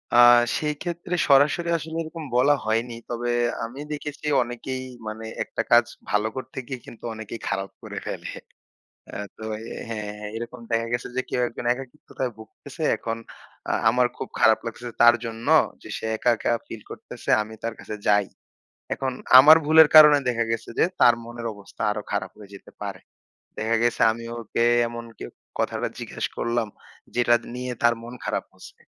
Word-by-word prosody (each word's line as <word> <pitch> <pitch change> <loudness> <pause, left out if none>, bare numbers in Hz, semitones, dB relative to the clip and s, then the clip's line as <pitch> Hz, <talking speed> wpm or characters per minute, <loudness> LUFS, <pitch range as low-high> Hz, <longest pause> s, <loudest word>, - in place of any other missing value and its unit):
আ - - +6 0.4
সেই 150 -1 -1
ক্ষেত্রে 175 +1 -3
সরাসরি 145 +5 +4
আসলে 160 0 -7
এরকম 160 0 -8
বলা 140 +4 +5
হয়নি। 115 +2 0
তবে 120 0 -2 0.4
আমি 120 +4 -9
দেখেছি 150 0 -7 0.2
অনেকেই 120 +2 -5 0.2
মানে 110 +1 -6 0.2
একটা - - -3
কাজ 120 0 +7 0.2
ভালো 105 +1 +2
করতে 130 +1 -7
গিয়ে 130 -2 -5
কিন্তু 115 - -13
অনেকেই 110 +1 -7
খারাপ 95 0 -2
করে - - -8
ফেলে। - - -5 0.8
অ্যা - - -6 0.2
তো - - -10 0.2
এ - - -10 0.3
হ্যাঁ। 105 -1 -5
এরকম 120 +1 -6
দেখা 115 0 +1
গেছে 120 - -1
যে 130 - +1
কেউ 125 - 0
একজন 120 - -8
একাকিত্বতায় 130 0 -6
ভুগতেছে, 110 -1 -10
এখন 115 0 -4 0.5
আ - - +1 0.2
আমার 125 +2 +3
খুব - - -5
খারাপ 110 0 +5
লাগতেছে 120 +1 -6
তার 120 0 +8
জন্য 115 +1 -6 0.4
যে - - -11
সে - - -6
একা, 120 - +1
একা - - 0 0.2
ফিল 115 - -8
করতেছে, - - -9
আমি 110 +1 -7
তার 115 0 -2
কাছে 110 - -6
যাই। 105 -1 +4 0.7
এখন 130 -1 -2 0.3
আমার 150 +4 +10
ভুলের 160 +1 +7
কারনে 150 -2 +9
দেখা 115 -1 +1
গেছে 115 0 -3
যে - - +5 0.2
তার 120 - +7
মনের 120 0 -7
অবস্থা 100 -1 -10
আরো 105 0 -3
খারাপ 105 +1 -2
হয়ে 100 -1 -13
যেতে 100 - -13
পারে। 100 -2 -5 0.6
দেখা 115 +1 +1
গেছে 120 0 +1
আমি 115 +1 -8
ওকে 115 0 -2 0.3
এমন 120 0 -7
কেউ - - -7 0.3
কথাটা - - -1
জিজ্ঞেস - - -4
করলাম 115 -1 -1 0.5
যেটা 120 -1 +4
দ - - -15
নিয়ে 125 0 -4
তার 120 0 +5
মন 120 +1 -8
খারাপ - - -2
হচ্ছে, - - -14
120 Hz, 175 wpm, -24 LUFS, 110-130 Hz, 0.8 s, আমার